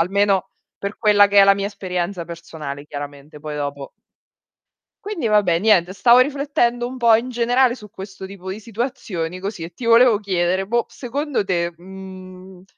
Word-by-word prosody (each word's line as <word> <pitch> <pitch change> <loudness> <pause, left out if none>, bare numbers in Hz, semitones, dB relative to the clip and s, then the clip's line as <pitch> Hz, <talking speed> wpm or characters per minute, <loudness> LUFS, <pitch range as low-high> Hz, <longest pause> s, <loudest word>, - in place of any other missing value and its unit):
Almeno, 195 +2 +1 0.3
per 200 +1 -5
quella 210 -2 +5
che 200 0 +5
è - - +8
la 195 0 +6
mia 200 0 -2
esperienza 180 -2 -4
personale 155 -4 -8
chiaramente, 145 +1 -9
poi 150 -1 -6
dopo 140 -1 -5 1.1
Quindi 350 - -2
vabbè, 200 -6 +3
niente, 185 -4 +3
stavo 235 +5 +5
riflettendo 255 -3 +1
un 255 +1 -7
po' 235 -2 +5
in 235 +3 0
generale 245 +1 +2
su 210 -4 -12
questo 190 0 -9
tipo 190 -1 -9
di 200 +3 -6
situazioni 215 -7 -4
così, 195 -3 -5
e 165 - -7
ti 235 +7 -8
volevo 230 -1 +6
chiedere, 185 -1 0
boh, 235 +3 +1
secondo 280 0 -3
te, 175 -3 -1
mhmm, 185 0 -12
195 Hz, 165 wpm, -21 LUFS, 175-230 Hz, 1.1 s, è